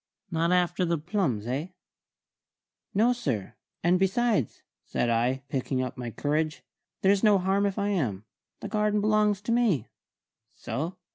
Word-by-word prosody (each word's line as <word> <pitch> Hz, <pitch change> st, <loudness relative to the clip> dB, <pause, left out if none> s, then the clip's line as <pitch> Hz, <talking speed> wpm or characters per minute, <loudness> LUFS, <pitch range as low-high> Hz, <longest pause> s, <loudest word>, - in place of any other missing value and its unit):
"Not 165 Hz, +1 st, +1 dB
after 180 Hz, 0 st, +2 dB
the 170 Hz, -1 st, +1 dB
plums, 155 Hz, -, -1 dB
eh?" 135 Hz, +7 st, -2 dB, 1.3 s
"No, 230 Hz, +5 st, +4 dB
sir; 130 Hz, -, -3 dB, 0.3 s
and 175 Hz, +2 st, +4 dB
besides," 195 Hz, -, +1 dB, 0.2 s
said 120 Hz, -, -1 dB
I, 125 Hz, +3 st, +1 dB
picking 130 Hz, -1 st, -1 dB
up 130 Hz, -, -5 dB
my 125 Hz, -3 st, -5 dB
courage, 155 Hz, +5 st, -1 dB, 0.4 s
"there's 195 Hz, 0 st, +4 dB
no 210 Hz, -2 st, +5 dB
harm 195 Hz, +2 st, +2 dB
if 195 Hz, -, -3 dB
I 200 Hz, 0 st, 0 dB
am. 115 Hz, -, -1 dB, 0.4 s
The -, -, -4 dB
garden 210 Hz, -1 st, +1 dB
belongs 210 Hz, -1 st, +2 dB
to 210 Hz, -, -3 dB
me." 225 Hz, -, +2 dB, 0.7 s
"So?" 165 Hz, +7 st, -4 dB
175 Hz, 145 wpm, -27 LUFS, 135-205 Hz, 1.3 s, no